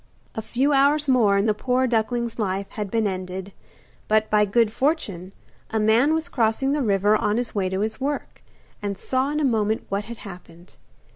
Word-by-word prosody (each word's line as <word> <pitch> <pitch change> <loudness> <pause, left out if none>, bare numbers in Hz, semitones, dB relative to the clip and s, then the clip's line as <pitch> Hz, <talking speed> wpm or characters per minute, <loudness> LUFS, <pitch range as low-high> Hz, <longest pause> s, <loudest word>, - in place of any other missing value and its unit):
A 220 - -4
few 270 +6 0
hours 285 +2 +3
more 225 -7 +4
and 200 +3 +1
the 215 - +3
poor 250 +4 0
duckling's 235 0 -1
life 195 -1 -1
had 210 -2 -4
been 225 +1 0
ended. 185 0 -4 0.5
But, 215 0 +2
by 210 0 +4
good 215 +1 +2
fortune, 210 - -1 0.4
a 220 - -1
man 230 +8 +3
was 320 +1 -2
crossing 255 -2 0
the 295 0 0
river 205 -2 +3
on 210 0 0
his 245 -1 -2
way 195 -3 0
to 190 +1 -2
his 220 +3 -3
work, 285 +1 -4 0.4
and 200 -2 -3
saw 260 +5 -1
in 300 +1 -1
a 300 - +1
moment 220 -3 0
what 200 +1 -2
had 235 0 -8
happened. 180 -3 -12
220 Hz, 195 wpm, -23 LUFS, 200-255 Hz, 0.5 s, more